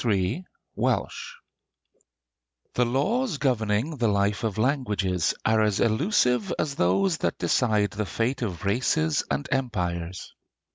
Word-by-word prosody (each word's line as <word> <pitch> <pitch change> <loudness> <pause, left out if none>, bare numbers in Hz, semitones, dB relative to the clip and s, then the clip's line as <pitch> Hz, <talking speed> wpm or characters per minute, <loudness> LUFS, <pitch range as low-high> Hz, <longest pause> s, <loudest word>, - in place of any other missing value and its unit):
III 110 - 0 0.3
WELSH - - -1 1.4
The 125 - +2
laws 185 - 0
governing 125 +2 0
the 120 -2 +1
life 100 0 +1
of 110 -2 -2
languages 105 - 0
are 110 0 +3
as 105 -2 +1
elusive 125 - +2
as 145 - -1
those 155 - +2
that - - -1
decide 105 -5 +1
the 105 -1 -3
fate 115 +9 -1
of 95 -6 -4
races 145 +8 +1
and 140 - -2
empires. 90 -9 -2
115 Hz, 125 wpm, -26 LUFS, 100-140 Hz, 1.4 s, are